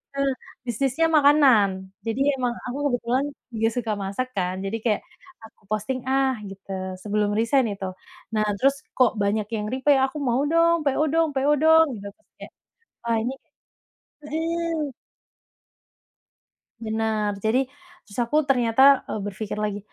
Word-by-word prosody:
Eee, 275 -1 +1 0.3
bisnisnya 265 +6 0
makanan 255 -11 +4 0.2
jadi 225 +4 -1 0.2
emang 245 -1 0
aku 250 +2 -4
kebetulan 245 +1 0 0.3
juga 225 0 0
suka 235 -3 -2
masak 200 +7 -2
kan 185 -4 -2
jadi 215 +3 -2
kayak 215 -3 +1 0.4
aku 220 - -15
posting, 215 +5 -1
ah, 265 0 +2 0.2
gitu 195 0 -11 0.3
sebelum 210 0 0
resign 245 +3 +3
itu. 195 - -6 0.5
Nah, 215 -1 +1
terus 275 +6 +3 0.2
kok 250 -3 +5
banyak 205 +1 0
yang 210 -1 -3
reply 275 +2 +3
aku 285 +3 -9
mau 245 +2 +2
dong 335 0 +4
PO 280 +3 +2
dong 330 0 +3
PO 275 +2 +2
dong 320 0 +7
gitu 200 - -8
terus - - -39
kayak, - - -10 0.5
Wah 235 -1 0
ini 250 +4 -2 0.9
mhm. 320 -1 -2 1.9
Bener, 220 -2 -1
jadi 245 +6 0 0.3
terus 205 +3 -9
aku 295 +6 +2
ternyata, 265 +2 +5
eee, - - -3
berpikir 205 +1 -5
lagi, 210 -1 -2
245 Hz, 140 wpm, -24 LUFS, 215-275 Hz, 1.9 s, dong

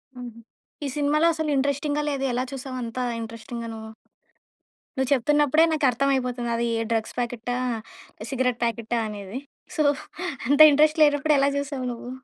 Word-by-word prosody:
హుహు. 240 -2 -9 0.5
ఈ - - -1
సినిమాలో 300 +3 +2
అసలు 315 -1 -2
ఇంట్రెస్టింగ్‌గా 285 +2 0
లేదు 275 -1 -2
ఎలా 250 - 0
చూసావు 260 -1 -6
అంత 230 +1 -7 0.2
ఇంట్రెస్టింగ్‌గా 230 +1 -7
నువ్వు? 220 0 -9 1.1
నువ్వు 265 0 0
చెప్తున్నప్పుడే 295 +4 +3
నాకర్థం 275 -2 +2
అయిపోతది 245 -2 -2
అది 235 0 0 0.2
డ్రగ్స్ 225 -1 -1
ప్యాకెటా? 245 0 -2 0.8
సిగరెట్ 250 -2 0
ప్యాకెటా? 230 0 -1
అనేది. 205 +2 -6 0.4
సో, 305 - +3 0.7
అంత 285 +1 +3
ఇంట్రెస్ట్ 305 +2 +3
లేనప్పుడు 290 0 +3
ఎలా 275 +1 +3
చూసావు 280 -2 -3
నువ్వు? 240 +1 -8
260 Hz, 135 wpm, -25 LUFS, 235-290 Hz, 1.1 s, చెప్తున్నప్పుడే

